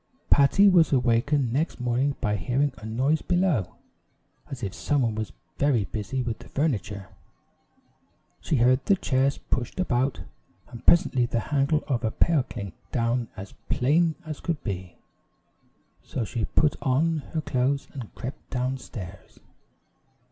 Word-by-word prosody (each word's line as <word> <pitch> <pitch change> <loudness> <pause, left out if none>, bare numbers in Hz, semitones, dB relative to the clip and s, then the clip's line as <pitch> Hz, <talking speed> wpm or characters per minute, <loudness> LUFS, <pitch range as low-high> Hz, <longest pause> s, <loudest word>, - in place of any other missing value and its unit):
Patty 145 +8 +6
was 175 -5 +5
awakened 125 0 +2
next 150 +3 -1
morning 125 +3 +1
by 105 -1 +1
hearing 135 +6 0
a 110 - -8
noise 130 +8 +1
below, 175 - +1 0.7
as 130 -3 -7
if 100 -1 -3
someone 125 0 0
was 110 -5 -4 0.3
very 135 -8 +3
busy 110 +6 -3
with 115 -2 -3
the - - -13
furniture. 105 - -2 1.3
She - - -1
heard 125 +1 +4
the 200 - +6
chairs 135 -5 +1
pushed 125 +8 -3
about, 130 -6 0 0.5
and 120 -2 -10
presently 130 -8 +5
the 115 - 0
handle 145 +2 +2
of 130 -5 -1
a 110 - +2
pail 160 +6 +2
klink 100 -7 -7 0.2
down 120 0 0
as 95 0 -8 0.2
plain 155 +5 +2
as 155 -2 -6
could 165 -3 -3
be. 95 -4 -5 1.0
So 120 - -3
she 110 +2 -2
put 150 -2 +2
on 155 +5 +2 0.2
her 160 - +1
clothes 135 0 0
and 125 -6 -7
crept 130 +2 -7
down 130 +1 -1
stairs. 95 -9 -10
130 Hz, 145 wpm, -26 LUFS, 115-145 Hz, 1.3 s, Patty